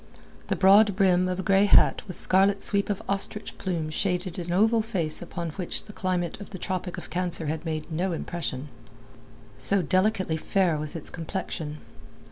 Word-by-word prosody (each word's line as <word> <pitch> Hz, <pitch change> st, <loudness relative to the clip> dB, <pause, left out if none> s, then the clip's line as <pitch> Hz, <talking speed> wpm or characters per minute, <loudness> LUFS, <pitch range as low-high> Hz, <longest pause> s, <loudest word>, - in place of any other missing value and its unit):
The -, -, 0 dB
broad 200 Hz, +1 st, +6 dB
brim 185 Hz, -2 st, +3 dB
of 180 Hz, 0 st, -2 dB
a -, -, -2 dB
grey 195 Hz, +2 st, +4 dB
hat 205 Hz, -, +5 dB
with 185 Hz, -, -7 dB
scarlet 195 Hz, +2 st, +3 dB
sweep 200 Hz, 0 st, +1 dB
of 205 Hz, -, -2 dB
ostrich 200 Hz, +2 st, 0 dB
plume 165 Hz, -5 st, -2 dB
shaded 180 Hz, +1 st, -2 dB
an 175 Hz, 0 st, -5 dB
oval 220 Hz, +5 st, +3 dB
face 185 Hz, -9 st, 0 dB
upon 170 Hz, -1 st, -5 dB
which 180 Hz, +2 st, -4 dB
the 210 Hz, -, -12 dB
climate 180 Hz, -1 st, -2 dB
of 200 Hz, -, -9 dB
the 190 Hz, -, -7 dB
Tropic 185 Hz, -1 st, -4 dB
of -, -, -9 dB
Cancer 175 Hz, -2 st, 0 dB
had 155 Hz, +2 st, -3 dB
made 155 Hz, 0 st, -4 dB
no 180 Hz, +4 st, -1 dB
impression, 155 Hz, -4 st, -4 dB, 0.9 s
so 195 Hz, -2 st, +1 dB
delicately 185 Hz, -1 st, +1 dB
fair 180 Hz, 0 st, +1 dB
was 155 Hz, +2 st, -5 dB
its 160 Hz, -, -5 dB
complexion. 165 Hz, -3 st, -5 dB
185 Hz, 175 wpm, -26 LUFS, 165-195 Hz, 0.9 s, broad